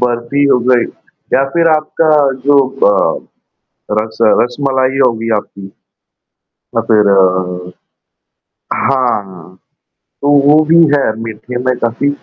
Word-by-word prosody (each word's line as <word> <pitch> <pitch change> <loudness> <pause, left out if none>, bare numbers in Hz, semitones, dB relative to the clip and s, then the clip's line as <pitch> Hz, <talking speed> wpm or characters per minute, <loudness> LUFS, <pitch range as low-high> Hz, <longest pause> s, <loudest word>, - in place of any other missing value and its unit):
बर्फी 120 +3 -1
हो 140 - +3
गई 125 -2 +3 0.5
या 135 - +3
फ़िर 165 +2 +1
आपका 155 +1 -2 0.4
जो 145 0 +5 0.3
अ, 95 - -1 0.7
रस 110 0 -6 0.2
रसमलाई 130 +1 -1
होगी 115 -2 -2
आपकी 100 -1 -9 0.9
या 115 - -5
फ़िर 105 -2 +4
अ, 90 -2 0 1.0
हाँ 100 -9 -2 0.7
तो 145 - 0 0.2
वो 150 +2 +5
भी 165 +2 +3 0.2
है 140 - +1 0.2
मीठे 115 +2 -7
में 130 0 0
काफ़ी 120 +4 -1
120 Hz, 115 wpm, -13 LUFS, 105-140 Hz, 1.0 s, जो